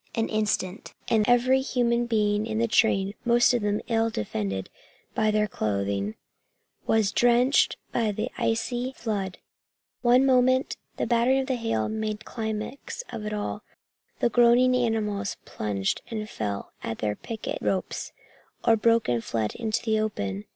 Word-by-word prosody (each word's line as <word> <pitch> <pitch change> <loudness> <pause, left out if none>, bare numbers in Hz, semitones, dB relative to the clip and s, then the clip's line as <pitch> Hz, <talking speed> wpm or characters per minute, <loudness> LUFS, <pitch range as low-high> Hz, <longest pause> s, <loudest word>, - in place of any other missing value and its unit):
An 225 0 0
instant 210 -3 -2
and 220 -2 +4
every 255 +2 +4
human 240 -2 +1
being 210 -1 +1
in 220 -1 -2
the 230 +1 +2
train, 200 -4 +2
most 240 +1 +4
of 240 - +1
them 205 0 0
ill 225 -1 +2
defended 100 - -3 0.5
by 215 -1 +2
their 210 0 +2
clothing, 100 - -2 0.7
was 220 -3 +3
drenched 245 +4 +3
by 225 -3 +1
the 210 +1 -3
icy 245 +3 -1
flood. 200 -7 -3 0.6
One 250 +2 +5
moment 255 0 +3 0.2
and - - -1
the - - +2
battering 240 +3 +3
of 265 - -9
hail 230 - 0
made 215 -1 -3
climax 220 - -5
of 220 -3 -5
it - - -3
all. 210 0 -3 0.6
The 240 - +4
groaning 245 +1 +5
animals 215 -5 -1
plunged 100 -2 -2
and 215 -2 -4
fell 100 - -4
at 110 - -4
their 105 -1 -1
picket 225 - -5
ropes, 190 -2 -2 0.5
or 230 - +6
broke 230 +1 +3
and 120 -2 0
fled 110 -2 -2
into 225 -1 -2
the 220 -2 +1
open. 100 - -3
220 Hz, 150 wpm, -26 LUFS, 200-240 Hz, 0.7 s, or